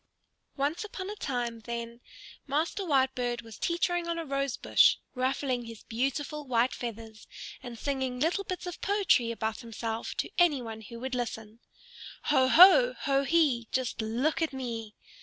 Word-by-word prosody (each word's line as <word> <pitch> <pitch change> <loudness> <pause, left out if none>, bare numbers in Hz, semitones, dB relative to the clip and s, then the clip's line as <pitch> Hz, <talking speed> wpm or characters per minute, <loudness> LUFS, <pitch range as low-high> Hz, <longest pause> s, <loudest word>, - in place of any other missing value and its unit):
Once 290 +7 -1
upon 395 -2 -6
a - - -6
time, 245 - -3
then, 235 0 -5 0.5
Master 315 +8 -1
Whitebird 260 -6 +1
was 225 -2 -12
teetering 345 0 0
on 335 0 -1
a 330 - -3
rose 275 -2 -1
bush, - - +5 0.2
ruffling 255 -1 -1
his 230 -2 -10
beautiful 275 +5 -2
white 245 0 +2
feathers 225 -2 -7 0.3
and 245 -2 -8
singing 260 -1 -2
little 340 +8 +1
bits 370 -1 -5
of 355 -2 -7
poetry 385 - +2
about 220 -1 -3
himself 230 -1 -5
to - - -2
any 335 -6 +4
one 225 -2 -7
who 230 +2 -10
would 260 +2 -5
listen. 225 -2 -4 0.6
"Ho 265 -3 +3
ho, 390 - +8
ho 275 0 +1
hee, 275 -8 +2
Just 255 -3 -1
look 240 +10 0
at 320 -3 0
me!" 230 -5 -5
260 Hz, 160 wpm, -29 LUFS, 235-310 Hz, 0.6 s, ho